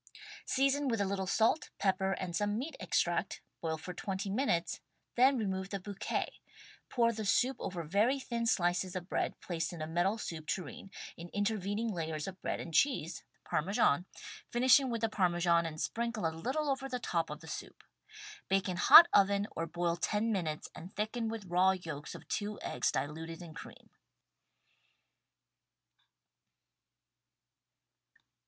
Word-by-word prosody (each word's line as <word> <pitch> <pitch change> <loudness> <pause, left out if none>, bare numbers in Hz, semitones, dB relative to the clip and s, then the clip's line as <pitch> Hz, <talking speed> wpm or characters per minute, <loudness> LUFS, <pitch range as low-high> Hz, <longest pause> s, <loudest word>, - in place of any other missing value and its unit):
Season 275 +2 +2
with 230 -4 0
a 200 - +2
little 190 -1 -2
salt, 225 +10 +2
pepper 190 0 +1
and 180 -3 -4
some 205 +2 0
meat 280 +7 -4
extract, - - 0 0.2
boil 160 -1 -1
for 180 +4 -7
20 195 +2 -3
minutes 195 -7 0 0.2
— - - -49
then 260 +2 +5
remove 190 -3 -2
the 200 - -3
bouquet 195 +1 -3 0.2
— - - -22
^pour 235 -2 +2
the 220 - -3
soup 255 +6 +2
over 175 -2 -4
very 210 - +2
thin 235 -3 -2
slices 180 -1 +1
of 180 -1 -4
bread - - -2
placed 170 -2 -2
in 175 - -8
a 155 - -3
metal 175 +6 +1
soup 160 -7 -6
tureen 210 +4 -4 0.3
in 170 +1 -8
intervening 205 +1 -1
layers 160 -3 -3
of 190 -1 -8
bread - - -2
and 165 - -7
cheese 180 - +2
— - - -40
Parmesan 175 0 +2 0.2
— - - -13
finishing 260 +2 +5
with 230 -2 -2
the 225 - +2
Parmesan 175 -4 +2
and 155 -1 -7
sprinkle 230 -2 -2
a 160 - 0
little 260 - -2
over 270 -1 -1
the 250 - -2
top 170 -8 -1
of 150 0 -6
the 160 - -12
soup. - - -7 0.6
Bake 195 0 +1
in 180 -2 -2
hot 335 - +10
oven 200 0 +4
or 165 - -2
boil 170 0 -1
ten 210 +5 0
minutes 160 -7 -2
and 180 +5 -10
thicken 220 +2 -2
with 225 -3 -5
raw 180 +2 +4
yolks 155 -4 -7
of - - -11
two 210 0 -3
eggs - - 0
diluted 160 +3 -4
in 170 -3 -10
cream. - - -12
195 Hz, 165 wpm, -33 LUFS, 170-230 Hz, 0.6 s, hot